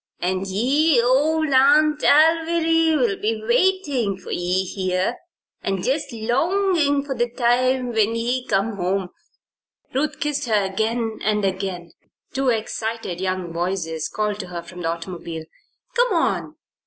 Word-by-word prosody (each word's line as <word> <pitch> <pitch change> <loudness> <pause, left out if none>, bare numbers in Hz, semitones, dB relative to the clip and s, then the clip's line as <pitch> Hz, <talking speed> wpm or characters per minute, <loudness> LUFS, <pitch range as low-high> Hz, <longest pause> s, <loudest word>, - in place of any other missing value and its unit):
And 185 +2 -1
yer 250 +6 +2
old 305 +5 +3
A'nt 295 +3 +4
Alviry'll 325 -5 +3
be 220 +1 0
waitin' 260 - +1
for - - -10
ye 180 +2 0
here, 185 +4 -1 0.4
an' 195 -2 -2
jest 275 +2 -1
longin' 285 - +1
for 280 -1 -4
the 240 -1 -1
time 250 +1 +1
when 220 0 +1
ye 245 +2 -1
come 200 +2 0
home." 185 0 -1 0.8
Ruth 285 +3 -1
kissed 290 -2 -1
her 210 -3 +2
again 220 +3 -2
and 210 -1 +1
again. 190 -3 -3 0.4
Two 265 0 +1
excited 220 -4 -3
young 185 -2 -2
voices 170 -2 -2
called 210 -1 -2
to 185 - -5
her 175 -1 -6
from 180 +1 -10
the 165 - -1
automobile. 165 -1 -5 0.5
"Come 485 -3 +3
on! 335 - 0
230 Hz, 135 wpm, -22 LUFS, 190-285 Hz, 0.8 s, A'nt